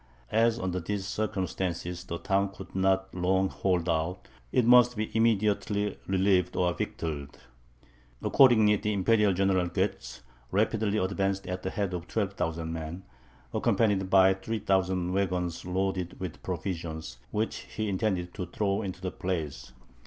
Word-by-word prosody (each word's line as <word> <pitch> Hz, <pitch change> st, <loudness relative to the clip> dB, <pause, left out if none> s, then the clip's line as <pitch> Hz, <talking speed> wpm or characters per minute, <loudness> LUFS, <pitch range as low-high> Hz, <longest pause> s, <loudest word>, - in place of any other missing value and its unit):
As 115 Hz, +1 st, +3 dB
under 90 Hz, -4 st, -2 dB
these 95 Hz, +3 st, -3 dB
circumstances 95 Hz, -4 st, -2 dB
the 85 Hz, -, -4 dB
town 100 Hz, +2 st, +1 dB
could 100 Hz, -, -11 dB
not 95 Hz, 0 st, +1 dB
long 95 Hz, +1 st, +1 dB
hold 90 Hz, -3 st, 0 dB
out, 85 Hz, +2 st, -1 dB, 0.2 s
it 125 Hz, -, +3 dB
must 125 Hz, 0 st, +6 dB
be 110 Hz, +1 st, -3 dB
immediately 105 Hz, -2 st, +1 dB
relieved 95 Hz, -2 st, +2 dB
or 90 Hz, -1 st, +2 dB
victualled. 75 Hz, -5 st, -4 dB, 0.9 s
Accordingly, 110 Hz, -6 st, +6 dB
the 105 Hz, +1 st, -1 dB
Imperial 105 Hz, +1 st, +3 dB
General 95 Hz, -1 st, +2 dB
Goetz 95 Hz, -3 st, -3 dB, 0.3 s
rapidly 110 Hz, +1 st, +1 dB
advanced 95 Hz, 0 st, 0 dB
at 90 Hz, 0 st, -4 dB
the 95 Hz, -, -3 dB
head 100 Hz, -1 st, -2 dB
of 90 Hz, -1 st, -4 dB
12,000 85 Hz, -6 st, -2 dB
men, 80 Hz, +3 st, -6 dB, 0.5 s
accompanied 100 Hz, -4 st, +2 dB
by 95 Hz, 0 st, +6 dB
3000 95 Hz, -3 st, 0 dB
waggons 90 Hz, -3 st, -1 dB
loaded 90 Hz, -1 st, -2 dB
with 90 Hz, -3 st, -6 dB
provisions, 85 Hz, -8 st, -4 dB
which 110 Hz, +1 st, -1 dB
he 110 Hz, 0 st, -5 dB
intended 95 Hz, -3 st, -1 dB
to 90 Hz, -4 st, -5 dB
throw 100 Hz, +3 st, -1 dB
into 95 Hz, -3 st, -5 dB
the 95 Hz, -, -3 dB
place. 75 Hz, -9 st, -4 dB
95 Hz, 140 wpm, -29 LUFS, 90-105 Hz, 0.9 s, must